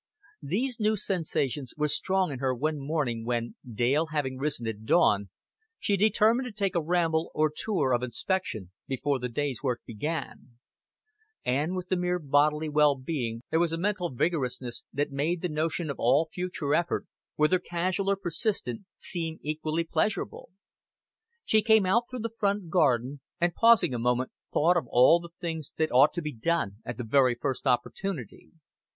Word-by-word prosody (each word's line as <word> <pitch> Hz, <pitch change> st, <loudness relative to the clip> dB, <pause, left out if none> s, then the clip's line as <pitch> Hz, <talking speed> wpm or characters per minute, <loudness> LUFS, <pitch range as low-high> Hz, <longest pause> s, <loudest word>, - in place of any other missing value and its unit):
These 225 Hz, -, -1 dB
new 215 Hz, 0 st, +2 dB
sensations 150 Hz, -, -2 dB
were 150 Hz, 0 st, +1 dB
strong 185 Hz, +2 st, +1 dB
in 130 Hz, -, -5 dB
her 130 Hz, -1 st, 0 dB
one 150 Hz, +4 st, -1 dB
morning 135 Hz, -6 st, -2 dB
when, 120 Hz, 0 st, -2 dB, 0.2 s
Dale 130 Hz, +8 st, +1 dB
having 140 Hz, -4 st, -2 dB
risen 140 Hz, -4 st, -1 dB
at 110 Hz, -1 st, -4 dB
dawn, 105 Hz, -, +3 dB, 0.5 s
she 205 Hz, -, +1 dB
determined 220 Hz, +5 st, +3 dB
to -, -, -6 dB
take 200 Hz, -2 st, -1 dB
a 170 Hz, -, +1 dB
ramble 165 Hz, -1 st, +1 dB
or 155 Hz, 0 st, +2 dB
tour 165 Hz, -12 st, 0 dB
of 120 Hz, -, +2 dB
inspection 125 Hz, -, -2 dB, 0.2 s
before 135 Hz, +1 st, -1 dB
the 125 Hz, 0 st, -3 dB
day's 140 Hz, +1 st, -2 dB
work 125 Hz, -4 st, -1 dB
began; 125 Hz, 0 st, -5 dB, 0.9 s
and 145 Hz, +8 st, 0 dB
with 180 Hz, -1 st, -5 dB
the 185 Hz, -, +2 dB
mere 180 Hz, 0 st, 0 dB
bodily 150 Hz, 0 st, +2 dB
well 150 Hz, -1 st, +4 dB
being 130 Hz, -4 st, -4 dB
there 160 Hz, -, +3 dB
was 170 Hz, -1 st, +2 dB
a 165 Hz, -, -1 dB
mental 185 Hz, -1 st, -1 dB
vigorousness 130 Hz, -4 st, -2 dB
that 145 Hz, +1 st, -1 dB
made 160 Hz, +6 st, -1 dB
the 180 Hz, -, 0 dB
notion 155 Hz, 0 st, -1 dB
of 140 Hz, -, -8 dB
all 140 Hz, +7 st, +3 dB
future 180 Hz, -5 st, -2 dB
effort, 170 Hz, +2 st, 0 dB, 0.3 s
whether 155 Hz, +5 st, +3 dB
casual 180 Hz, +3 st, -1 dB
or 200 Hz, -, +3 dB
persistent, 195 Hz, +4 st, -2 dB, 0.2 s
seem 165 Hz, -3 st, -3 dB
equally 155 Hz, +2 st, -1 dB
pleasurable. 165 Hz, +5 st, -2 dB, 1.0 s
She 220 Hz, -, +4 dB
came 220 Hz, -2 st, +4 dB
out 230 Hz, +6 st, +3 dB
through 255 Hz, -2 st, -5 dB
the 230 Hz, 0 st, -4 dB
front 200 Hz, -4 st, 0 dB
garden, 140 Hz, -5 st, +2 dB, 0.2 s
and 175 Hz, 0 st, +2 dB
pausing 225 Hz, -, +5 dB
a 120 Hz, -, -2 dB
moment 125 Hz, +2 st, 0 dB, 0.2 s
thought 175 Hz, +4 st, +3 dB
of 150 Hz, -8 st, -1 dB
all 125 Hz, +8 st, +6 dB
the 170 Hz, 0 st, -10 dB
things 160 Hz, -5 st, -4 dB
that 160 Hz, -, +1 dB
ought 135 Hz, +4 st, +6 dB
to 175 Hz, -, -2 dB
be 150 Hz, -1 st, -4 dB
done 110 Hz, -5 st, -1 dB
at 120 Hz, -, -5 dB
the 125 Hz, -, -4 dB
very 125 Hz, +1 st, +3 dB
first 130 Hz, +2 st, -3 dB
opportunity. 125 Hz, -, -2 dB
155 Hz, 170 wpm, -28 LUFS, 130-180 Hz, 1.0 s, all